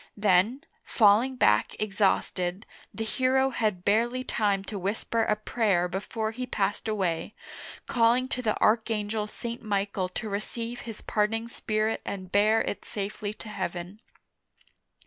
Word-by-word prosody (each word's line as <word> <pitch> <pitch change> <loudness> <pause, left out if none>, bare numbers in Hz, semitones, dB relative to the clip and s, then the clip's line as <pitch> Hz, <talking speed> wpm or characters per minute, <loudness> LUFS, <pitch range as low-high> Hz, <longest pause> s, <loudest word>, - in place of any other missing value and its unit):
Then, 205 +6 +3 0.2
falling 225 +4 +4
back 105 - +3
exhausted, 195 -2 0 0.3
the 225 - -4
hero 260 +4 +2
had 210 -7 -1
barely 235 +5 +2
time 205 -5 0
to 200 0 -5
whisper 210 +4 -1
a 215 -1 +2
prayer 210 -4 +1
before 215 +4 -3
he 250 +2 -5
passed 205 -2 -1
away, 195 -2 -1 0.5
calling 240 +2 +3
to 250 - -2
the 215 -3 0
Archangel 215 -1 +1
St. 235 +2 -6
Michael 200 -3 -1
to 220 +4 -5
receive 230 +4 -4
his 220 - -8
parting 225 +2 0
spirit 215 -1 -1
and 185 -2 -6
bear 215 +2 +4
it - - -4
safely 205 0 -4
to 215 - -10
heaven. 185 0 -5
215 Hz, 135 wpm, -28 LUFS, 200-230 Hz, 0.5 s, falling